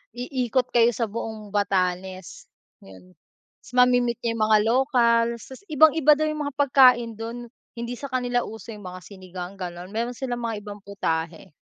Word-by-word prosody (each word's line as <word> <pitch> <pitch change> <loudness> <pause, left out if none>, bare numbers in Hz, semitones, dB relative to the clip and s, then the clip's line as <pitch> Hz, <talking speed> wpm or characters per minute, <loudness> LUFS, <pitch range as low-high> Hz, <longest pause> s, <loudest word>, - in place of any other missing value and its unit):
iikot 250 0 -1
kayo 235 -1 +5
sa 230 - -1
buong 215 -1 -6
Batanes, 185 -2 -2 0.4
yun. 90 -1 -16 0.5
Tas - - -17
mame-meet 245 -1 +4
niyo 235 - 0
yung 220 - 0
mga 215 - +6
lokals, 235 -2 +2
tas 265 - -10
ibang-iba 305 0 +5
daw 310 - 0
yung 305 -1 -3
mga 285 - -7
pagkain 255 -4 +5
dun. 235 +2 -6 0.3
Hindi 235 +1 -5
sa 280 - -5
kanila 245 -1 0
uso 225 +1 -9
yung 205 -2 -11
mga 180 0 -8
sinigang, 185 -1 -9
gano'n, 180 0 -7
meron 235 +3 -3
silang 245 -3 -3
mga 230 -1 -2
ibang 205 0 -8
putahe. 170 -3 -3
230 Hz, 165 wpm, -24 LUFS, 195-250 Hz, 0.5 s, mga